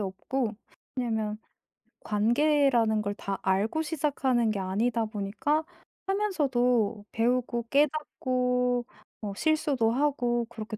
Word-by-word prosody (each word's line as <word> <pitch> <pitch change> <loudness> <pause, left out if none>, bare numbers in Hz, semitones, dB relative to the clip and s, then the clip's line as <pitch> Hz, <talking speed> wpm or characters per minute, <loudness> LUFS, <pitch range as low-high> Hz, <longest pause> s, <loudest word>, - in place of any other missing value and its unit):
없고. 210 +4 -2 0.4
왜냐하면 220 -3 -1 0.7
관계라는 235 0 +3
걸 205 -1 -3
다 195 -2 -4
알고 200 +11 +1
시작하는 270 -7 +1
게 205 - -2
아니다 220 +5 0
보니까 220 +9 -1 0.4
하면서도 250 - +1
배우고 240 0 0
깨닫고 250 -4 +1 0.4
뭐 205 -2 -4
실수도 285 -4 +2
하고 245 -3 +1
그렇게 215 -2 -7
240 Hz, 245 characters per minute, -28 LUFS, 215-275 Hz, 0.7 s, 관계라는